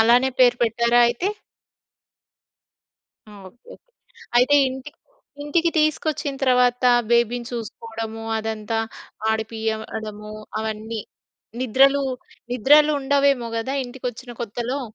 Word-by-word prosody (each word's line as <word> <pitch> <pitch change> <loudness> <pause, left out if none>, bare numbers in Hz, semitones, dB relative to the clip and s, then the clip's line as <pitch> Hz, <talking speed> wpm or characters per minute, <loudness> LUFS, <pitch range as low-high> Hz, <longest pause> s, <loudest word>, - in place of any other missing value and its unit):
అలానే 240 +4 +5
పేరు 245 -1 +5
పెట్టారా 235 +1 +2
అయితే? 240 +11 -2 2.0
ఆ! - - -13 0.2
ఓకే. 245 - -33 0.2
ఓకే. - - -24 0.5
అయితే 255 +4 +5
ఇంటికి 265 +3 -9 0.5
ఇంటికి 330 +3 +1
తీసుకొచ్చిన 305 -2 0
తర్వత 250 -1 +3 0.3
బేబీని 235 0 +2
చూసుకోవడము, 225 -1 -6 0.2
అదంతా 220 0 -3 0.5
ఆడిపియ్యడము 220 -1 -4 0.3
అవన్నీ. 220 0 -4 0.6
నిద్రలు 270 +3 +4 0.5
నిద్రలుండవేమో 280 0 +3
గదా! 230 +4 -2
ఇంటికొచ్చిన 245 0 -7
కొత్తలో? 240 +4 -3
240 Hz, 90 wpm, -22 LUFS, 225-270 Hz, 2.0 s, అలానే